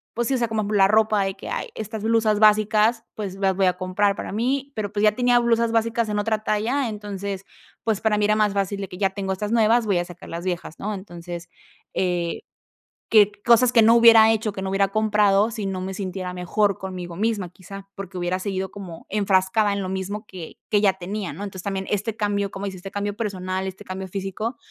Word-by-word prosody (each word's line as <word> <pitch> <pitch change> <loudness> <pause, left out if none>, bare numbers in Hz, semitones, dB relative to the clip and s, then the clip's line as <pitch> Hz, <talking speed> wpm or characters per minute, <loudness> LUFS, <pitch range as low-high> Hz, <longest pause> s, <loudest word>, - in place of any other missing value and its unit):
pues 240 0 0
sí, - - +1
o 260 - +2
sea, 235 - +1
como 220 -1 -1
la 195 -1 +5
ropa 215 0 +3
de 195 0 -2
que: - - -9
"Ay, - - -3
estas 220 0 -5
blusas 220 -2 +2
básicas, 215 +2 +4
pues, 200 -3 -5
las 195 -1 +1
voy 190 0 +2
a 180 - +3
comprar 190 +2 +1
para - - -6
mí", 265 +6 -1
pero, 210 -2 -3
pues, 205 0 0
ya 215 - +6
tenía 245 +1 +3
blusas 235 -1 +2
básicas 230 0 +1
en 210 - -1
otra 215 0 -1
talla, 235 +6 0
entonces, 200 -2 -5 0.4
pues, 220 -3 0
para 215 -1 +2
mí 210 - +1
era 215 +1 +3
más 210 -2 +2
fácil 200 0 -1
de 195 - -4
que 180 - -9
ya 195 -1 +2
tengo 195 -1 -3
estas 210 +3 -4
nuevas, 230 0 +4
voy 195 -4 +2
a 175 - -2
sacar 175 0 -12
las 170 +2 -6
viejas, 175 -3 -4
¿no?, 210 +1 -3
entonces, 175 -2 -8 0.4
eh, 175 -2 -1 0.7
que 210 -2 +6 0.2
cosas 240 +1 +5
que 230 - +6
no 225 +1 +6
hubiera 230 -1 +8
hecho, 220 -1 -1
que 190 -1 -6
no 190 - -3
hubiera 195 0 +2
comprado 210 0 +3
si 215 -3 -4
no 190 -1 -3
me 190 +1 -4
sintiera 185 -1 -4
mejor 195 +2 0
conmigo 180 -2 -6
misma, 205 -3 -1
quizá, 195 +2 -11
porque 195 -1 -7
hubiera 175 +1 -1
seguido 190 -1 -3
como 185 -5 -9
enfrascada 200 +1 +2
en 200 - -2
lo 185 - -4
mismo 195 +3 -4
que 180 -5 -9
que 205 - +3
ya 195 -2 +4
tenía, 190 +1 -5
¿no?, 200 - -6
entonces 190 -3 -7
también 195 -1 -3
este 210 +2 -1
cambio, 205 -2 -1
cómo 195 +1 -5
dices, 190 -2 -5
este 195 +2 -8
cambio 205 0 -3
personal, 190 -4 -3
este 190 +2 -9
cambio 190 0 -6
físico, 195 +5 -4
200 Hz, 225 wpm, -23 LUFS, 190-215 Hz, 0.7 s, hubiera